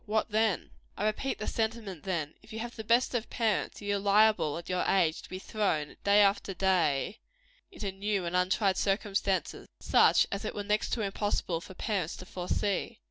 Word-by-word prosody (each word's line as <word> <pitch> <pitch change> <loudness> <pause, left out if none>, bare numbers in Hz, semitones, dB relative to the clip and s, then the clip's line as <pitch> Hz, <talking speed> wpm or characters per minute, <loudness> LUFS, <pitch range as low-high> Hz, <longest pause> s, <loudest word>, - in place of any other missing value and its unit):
What 215 +1 0
then? 215 -3 +1 0.3
I 205 - -1
repeat 215 +5 -1
the 215 - -4
sentiment, 220 -6 -3
then: 165 -5 -2
if 215 - -17
you 220 - -6
have 235 +2 -5
the 220 - -6
best 235 +4 +2
of 240 -2 -2
parents, 225 -2 -1
you 205 0 0
are - - -3
liable, 205 -6 +3
at 170 - -8
your 180 -1 0
age, 170 -5 +2
to - - -13
be 185 - -5
thrown, 185 -7 -1
day 200 +1 +5
after 200 -1 +1
day, 185 0 +1 0.5
into 210 - -4
new 195 -1 -2
and 170 +1 -2
untried 190 +1 +2
circumstances 195 -1 -1
such - - +5
as 200 +1 -3
it 215 - -4
were 205 - -3
next 210 +1 0
to 230 - 0
impossible 195 -4 -1
for 190 - -11
parents 195 -7 -2
to 185 - -9
foresee. 185 +2 -2
200 Hz, 190 wpm, -30 LUFS, 185-215 Hz, 0.5 s, day